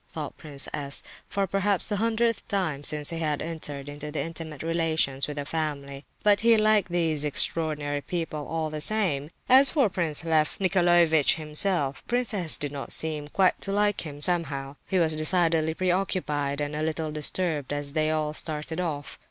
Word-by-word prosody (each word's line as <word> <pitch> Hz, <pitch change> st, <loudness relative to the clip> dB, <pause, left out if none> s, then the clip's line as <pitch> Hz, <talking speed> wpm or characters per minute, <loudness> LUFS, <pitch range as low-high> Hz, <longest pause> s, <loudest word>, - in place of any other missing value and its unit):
thought 150 Hz, -3 st, -6 dB
Prince 145 Hz, -4 st, -5 dB
S., 140 Hz, -2 st, -2 dB, 0.3 s
for 200 Hz, -1 st, 0 dB
perhaps 195 Hz, +1 st, 0 dB
the 205 Hz, -, -2 dB
hundredth 230 Hz, +1 st, 0 dB
time 165 Hz, -8 st, -1 dB
since 150 Hz, +1 st, +4 dB
he 165 Hz, -, -4 dB
had 150 Hz, -3 st, -1 dB
entered 150 Hz, -4 st, -4 dB
into 145 Hz, +1 st, -7 dB
intimate 160 Hz, -3 st, -5 dB
relations 160 Hz, -5 st, +1 dB
with 150 Hz, 0 st, -6 dB
the 145 Hz, -, -3 dB
family; 140 Hz, -3 st, -4 dB, 0.2 s
but—he 215 Hz, +2 st, +4 dB
liked 215 Hz, -3 st, +2 dB
these 160 Hz, -4 st, +1 dB
"extraordinary 150 Hz, -1 st, +1 dB
people," 160 Hz, -3 st, -4 dB
all 160 Hz, -1 st, -3 dB
the 155 Hz, 0 st, -5 dB
same. 160 Hz, -8 st, +1 dB, 0.2 s
As 265 Hz, +2 st, +7 dB
for 275 Hz, -9 st, +2 dB
Prince 170 Hz, -4 st, -2 dB
Lef 155 Hz, -2 st, +1 dB
Nicolaievitch 175 Hz, -5 st, +4 dB
himself, 155 Hz, -2 st, -1 dB
Prince 245 Hz, -1 st, 0 dB
S. 175 Hz, -6 st, +4 dB
did 145 Hz, -1 st, -4 dB
not 140 Hz, -2 st, -6 dB
seem 155 Hz, -2 st, 0 dB
quite 185 Hz, +4 st, +1 dB
to 195 Hz, -, -2 dB
like 205 Hz, 0 st, +1 dB
him, 145 Hz, -2 st, -8 dB
somehow. 145 Hz, -5 st, 0 dB
He 190 Hz, -, 0 dB
was 165 Hz, -3 st, +2 dB
decidedly 160 Hz, -1 st, +2 dB
preoccupied 175 Hz, -6 st, -1 dB
and 145 Hz, 0 st, -3 dB
a 150 Hz, -, -3 dB
little 155 Hz, 0 st, -2 dB
disturbed 150 Hz, -1 st, -1 dB
as 145 Hz, -1 st, -4 dB
they 155 Hz, -1 st, +1 dB
all 155 Hz, -1 st, -1 dB
started 155 Hz, +1 st, -3 dB
off. 150 Hz, -5 st, -4 dB
160 Hz, 170 wpm, -26 LUFS, 150-180 Hz, 0.3 s, As